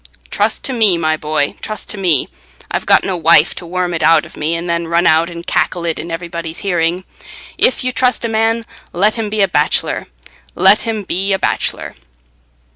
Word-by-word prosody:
"Trust - - 0
to 265 - -3
me, 215 -7 +3
my 155 -1 0
boy, 150 -2 -1
trust 215 -1 -5
to 210 - -5
me. 170 -8 +1 0.4
I've - - -3
got - - +5
no 190 - -2
wife 165 -1 +4
to 175 - -8
worm 180 0 -2
it 165 - -3
out 160 0 +4
of - - -14
me 155 +2 -1
and 170 +1 -4
then 170 0 -1
run 170 +1 +1
out 160 +1 +3
and 170 0 -9
cackle 170 0 -1
it 165 -1 -2
in 170 - -6
everybody's 165 -1 -5
hearing. 175 -1 0 0.6
If 255 - +3
you 255 - -1
trust 250 -1 0
a - - +1
man, 225 +1 0 0.3
let 205 +5 +2
him 225 -2 -3
be 210 -1 +1
a - - +3
bachelor—let 185 - 0
him 220 -2 -2
be 195 +2 -1
a - - +2
bachelor." - - -2
175 Hz, 200 wpm, -16 LUFS, 165-205 Hz, 0.6 s, got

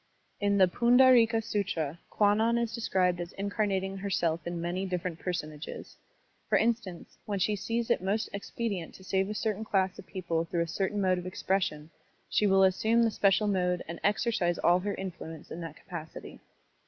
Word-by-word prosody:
In 200 0 +2
the 190 -1 +6
Pundartka 235 +1 +5
SUtra 180 -8 -2
Kwannon 220 +3 +3
is 235 -1 -1
described 185 -6 +1
as 175 - -7
incarnating 195 -1 -1
her 200 +1 -4
self 170 -3 0
in 175 0 -3
many 175 +3 -2
different 180 -3 -3
personages. 155 -4 -5 0.5
For - - +4
instance, 220 -6 -2
when 205 -1 -2
she 210 +2 +1
sees 230 +4 -2
it - - +2
most 200 +4 0
expedient 200 -3 -4
to 190 - -14
save 190 +1 0
a 210 - -4
certain 215 -1 -1
class 190 -3 0
of - - -11
people 170 -3 -2
through 170 0 0
a - - -6
certain 195 +5 -1
mode 185 -1 +2
of 180 - -7
expres 190 +1 0
sion, 150 +1 -7 0.4
she 210 - +2
will 195 0 +4
asstmie 220 +5 +3
the 225 - +2
special 200 0 +3
mode 180 -3 +1
and 170 +1 -6
exercise 205 -4 +1
all 175 +1 +4
her 200 +2 -3
influence 165 -4 -7
in 170 - -6
that 165 -2 -7
capacity. 165 -3 -9
190 Hz, 180 wpm, -29 LUFS, 175-210 Hz, 0.5 s, the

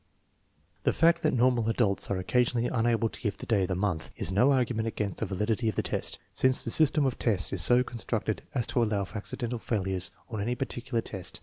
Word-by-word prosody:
The - - +1
fact 165 +1 +3
that - - +2
normal 120 -2 +2
adults 110 -4 0
are 100 - 0
occasionally 120 +5 +1
unable 115 -1 +1
to - - -8
give 105 -3 -2
the - - -8
day 110 -5 +2
of 95 - 0
the 95 - -2
month 90 -4 -2
is - - -2
no 125 +9 +4
argument 120 -4 0
against 105 -4 -3
the - - -2
valid 105 +3 -1
ity 110 +1 0
of 105 - -4
the - - 0
test, - - -3 0.2
since 130 0 +3
the 115 - -3
system 150 0 +3
of 130 - -1
tests 100 -6 +2
is 95 - +2
so 125 +6 +5
constructed 115 -3 -3
as 120 -4 +1
to 120 - 0
allow 105 -3 0
for 90 +4 -8
accidental 120 +3 -4
failures 95 -5 -1 0.2
on 110 -4 -4
any 120 +4 -1
particular 120 -2 -3
test. 95 -5 -7
115 Hz, 225 wpm, -28 LUFS, 100-125 Hz, 0.2 s, so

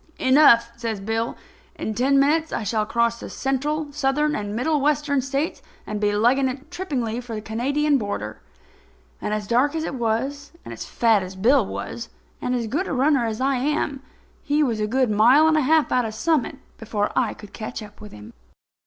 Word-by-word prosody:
"Enough," 260 -4 +5
says 230 -3 -3
Bill. 225 +3 -2 0.4
"In 220 - -4
ten 265 +5 +3
minutes 315 +3 +2
I - - -2
shall 210 +1 -1
cross 235 0 +1
the - - -8
Central, 290 +3 -2
Southern 295 +1 +1
and 205 0 -4
Middle 290 +5 +1
Western 290 -1 +1
States, 275 +4 -2 0.2
and 210 0 -4
be 205 0 +2
legging 240 +6 +3
it 270 +5 -8
trippingly 260 -11 -3
for 240 -2 -7
the 215 - -4
Canadian 275 +7 0
border." 200 - -5 0.8
And, - - -3
as 210 -1 -2
dark 255 +8 +2
as 320 - -1
it 320 - -4
was, 265 +5 -2
and - - -7
as - - -7
fat 225 -3 +2
as 185 +1 -7
Bill 240 +7 +4
was, 230 +3 -6 0.3
and 250 - -1
as 240 -2 -1
good 295 - -2
a - - -3
runner 265 -2 +2
as 220 -1 -4
I 270 0 +1
am, 280 0 -1 0.4
he 295 +1 +1
was 235 -6 -1
a 210 - 0
good 255 0 +1
mile 245 +9 +5
and 320 - +3
a 310 - +3
half 310 +2 +3
out 250 - +3
of 220 -1 -5
Summit 305 -2 0 0.2
before 215 -2 -2
I 245 -4 +1
could 210 -2 -13
catch 220 +1 -6
up 210 0 -14
with 210 - -10
him. 105 0 -12
250 Hz, 200 wpm, -23 LUFS, 220-285 Hz, 0.8 s, Enough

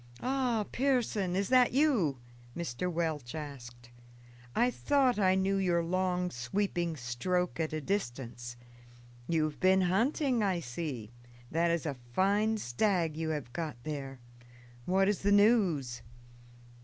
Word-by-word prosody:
"Ah, 250 -4 0
Pearson! 235 -8 +1
is 195 +1 0
that 255 -2 +5
you?" 250 - +2 0.4
Mr. 170 +1 -3
Welch 160 -7 -2
asked. 120 -5 -8 0.6
"I 245 +2 +3
thought 265 -4 +2
I 190 -2 +4
knew 190 +1 +1
your 175 -3 +2
long, 180 0 0
sweeping 170 +6 -1
stroke 165 +10 -1
at 160 -1 -1
a 155 0 -3
distance. 120 - -4 0.7
You 165 -2 +2
have 155 -1 -3
been 190 0 +4
hunting, 235 - +1
I 190 -4 +1
see; 125 -6 -5 0.4
that 170 +2 +2
is 170 -2 0
a 150 - -1 0.2
fine 205 - +2
stag 170 - 0
you 160 0 -2
have 145 -6 -4
got 155 -4 -4
there. 135 -3 -5 0.7
What 195 +1 +3
is 205 -1 +1
the 200 - +1
news?" 195 - +3
180 Hz, 135 wpm, -31 LUFS, 145-205 Hz, 0.7 s, that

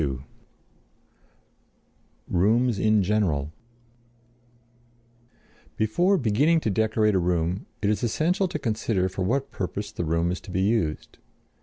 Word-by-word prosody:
II 70 -4 -1 2.1
ROOMS 110 +5 +2
IN 110 0 +3
GENERAL 90 -8 0 2.3
Before 175 - +2
beginning 145 - +2
to 110 - -1
decorate 110 +1 +2
a 95 - +3
room 85 +1 -1 0.2
it 100 - +2
is 105 - -1
essential 170 - +1
to 170 - -4
consider 110 -6 -1
for 95 +1 -6
what 130 +9 -1
purpose 100 +3 -4
the - - -4
room 85 +1 0
is 90 - -4
to - - -13
be 95 +1 -1
used. 95 -7 -1
105 Hz, 125 wpm, -25 LUFS, 90-115 Hz, 2.3 s, IN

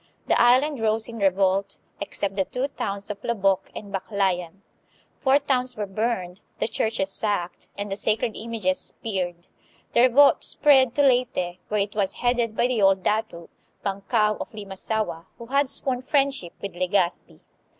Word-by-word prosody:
The - - +3
island 260 +4 +4
rose 220 0 +1
in 230 -1 -8
revolt, 195 0 +1 0.2
except 200 -1 -3
the 190 -1 0
two 260 +7 -3
towns 200 -5 -4
of 205 - -9
Lobok 195 -4 +1
and 200 -1 -8
Baklayan. 190 -1 -2 0.6
Four 270 +1 +4
towns 255 -4 -1
were 210 - -2
burned, 195 -2 -3 0.2
the - - 0
churches 220 -3 -1
sacked, 200 -4 -2
and 205 0 -4
the - - -1
sacred 215 +2 0
images 215 -5 -2
speared. 180 -5 -4 0.5
The - - +5
revolt 255 +3 +5
spread 265 -4 +4
to 285 - +3
Leyte, 245 -9 +1
where 210 -1 0
it 200 +1 -2
was 200 -3 0
headed 240 -2 0
by - - +3
the 245 -3 0
old 195 -1 +4
dato, 210 -6 -2 0.3
Bankao 210 +2 +1
of - - -5
Limasaua, 200 -3 -3
who 235 - -9
had 275 +2 +1
sworn 255 -2 -1
friendship 275 - 0
with 200 - -6
Legazpi. 180 0 -1
210 Hz, 160 wpm, -24 LUFS, 195-240 Hz, 0.6 s, The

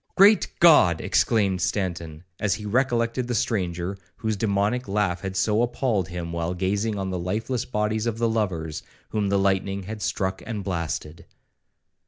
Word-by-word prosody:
'Great 200 +2 +6
G 155 - +7
d!' - - -8
exclaimed 100 -5 +2
Stanton, 85 -5 -2 0.2
as 105 -2 +1
he 105 -1 -8
recollected 120 +1 +1
the 120 - -1
stranger 90 -4 -1 0.2
whose 110 -2 -1
demoniac 105 +4 0
laugh 100 -3 0
had 95 -1 -4
so 110 +3 +2
appalled 120 -6 0
him, 85 -1 -5
while 85 +1 -2
gazing 100 +4 -1
on 95 -1 -3
the 90 - -2
lifeless 110 +7 -2
bodies 105 0 -1
of 115 -1 -1
the 115 0 +1
lovers, 85 -9 -2 0.3
whom 105 -2 0
the 100 - +2
lightning 95 0 0
had 105 +3 -7
struck 95 0 -1
and 105 -3 -4
blasted. 85 -3 -4
100 Hz, 165 wpm, -25 LUFS, 90-110 Hz, 0.3 s, G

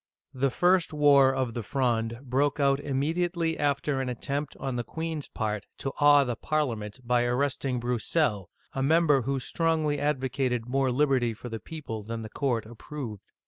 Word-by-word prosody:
The 135 +1 +1
first 175 +4 +2
war 140 -3 +6
of 130 -3 -1
the 120 - -3
Fronde 115 0 0
broke 140 +3 0
out 140 -1 +3
immediately 160 +4 -1
after 140 -1 0
an 130 - -2
attempt 140 +4 -3
on 135 -2 -3
the 120 - -1
queen's 160 +1 -4
part 105 -2 -3
to 135 - -3
awe 145 -1 +7
the 120 -3 -2
Parliament 115 -6 -2
by 120 0 +2
arresting 130 +1 0
Broussel 125 +5 +1
(broo 105 - -7
sel'), 95 0 -16 0.2
a 135 - -2
member 150 -1 +4
who 135 +2 -1
strongly 155 +1 0
advocated 130 -4 0
more 135 +1 +1
liberty 130 -4 +2
for 120 - -8
the 115 -1 -5
people 140 -9 -6
than 115 +2 -5
the 110 - -7
court 120 -3 -1
ap 115 +1 -13
proved. 125 -9 -6
135 Hz, 180 wpm, -28 LUFS, 120-145 Hz, 0.2 s, awe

